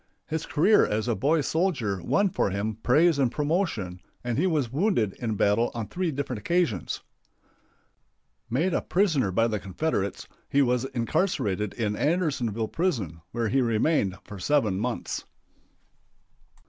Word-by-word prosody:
His 160 0 -3
career 200 +8 +4
as 110 +2 -1
a 120 - +2
boy 145 +10 +2
soldier 140 - 0
won 200 - +2
for - - +1
him 100 +3 -2
praise 155 +5 +4
and 130 -4 +2
promotion, 145 - -1 0.2
and 120 -1 -1
he 185 - +3
was 145 -9 0
wounded 145 - +1
in 115 -3 -2
battle 105 +4 +2
on 115 -2 -2
three 180 -1 -1
different 135 -5 -3
occasions. 155 - 0 1.5
Made 160 +10 +1
a - - +1
prisoner 155 - +1
by 115 +5 +2
the 110 -2 -1
Confederates, 100 - -2 0.2
he 140 0 +4
was 125 0 +1
incarcerated 120 - -1
in 105 -3 -1
Andersonville 130 - 0
prison, 110 - -1
where 115 -2 -1
he 135 +4 +2
remained 115 - +1
for 105 - -9
seven 105 -3 +1
months. 120 +2 -3
125 Hz, 145 wpm, -26 LUFS, 105-160 Hz, 1.5 s, career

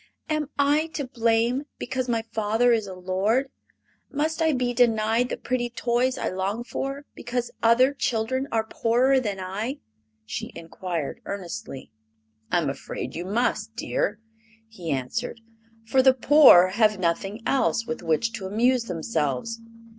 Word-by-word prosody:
"Am 305 -2 -1
I 290 +3 +3
to 285 - -2
blame 235 +2 +1
because 255 0 -3
my 230 -1 0
father 225 +1 +1
is 220 -3 +1
a 190 - -7
lord? 195 +9 0 0.6
Must 310 +2 -1
I 320 -1 +4
be 250 -3 0
denied 230 0 +2
the - - -3
pretty 240 -1 -2
toys 245 +2 0
I - - -2
long 195 +5 -2
for 275 +3 -4
because 240 0 -3
other 245 +4 +5
children 260 0 -1
are 225 -1 +1
poorer 245 +4 +2
than 205 -6 -3
I?" 205 +9 -4 0.5
she 110 - -5
inquired 165 -2 -5
earnestly. 170 - -6 0.6
"I'm 175 -4 +1
afraid 135 - -5
you 175 - -5
must, 220 +1 -1
dear," 210 -3 -1 0.5
he 185 -7 -8
answered; 145 - -3 0.5
"for 260 +4 +3
the 260 0 +5
poor 260 -9 +7
have 215 +1 +2
nothing 190 +4 -1
else 245 -4 +1
with 240 0 -4
which 170 +7 0
to 200 -4 -5
amuse 235 +4 +2
themselves. 170 - -2
230 Hz, 145 wpm, -25 LUFS, 195-255 Hz, 0.6 s, poor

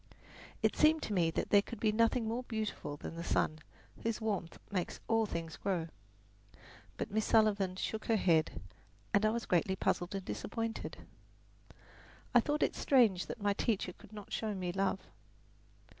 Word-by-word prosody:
It - - +3
seemed 310 +1 +4
to 210 - -2
me 170 -4 +3
that - - -2
there 205 - +7
could 235 +3 -8
be 215 - +3
nothing 230 +1 +2
more 230 +3 -1
beautiful 220 - -4
than - - -7
the 170 - -5
sun, 155 -2 +1 0.4
whose 230 -1 -1
warmth 200 -7 -2
makes 185 -3 -2
all 225 -1 +2
things 165 -3 -5
grow. 175 -4 -1 1.1
But - - -3
Miss 215 +1 +1
Sullivan 205 -5 +3
shook 215 +3 -3
her 225 - +3
head, 160 - +2 0.5
and 210 +1 +4
I - - +4
was 230 +1 -2
greatly 180 +2 +2
puzzled 180 0 0
and 195 -1 -4
disappointed. 225 +1 -4 1.3
I 245 - +8
thought 295 +5 +1
it - - +1
strange 225 -10 +3
that 210 - -6
my 205 0 +3
teacher 200 -3 -1
could - - -17
not 210 -2 -9
show 215 -2 -1
me 180 -2 -2
love. 195 +1 0
205 Hz, 170 wpm, -34 LUFS, 185-225 Hz, 1.3 s, I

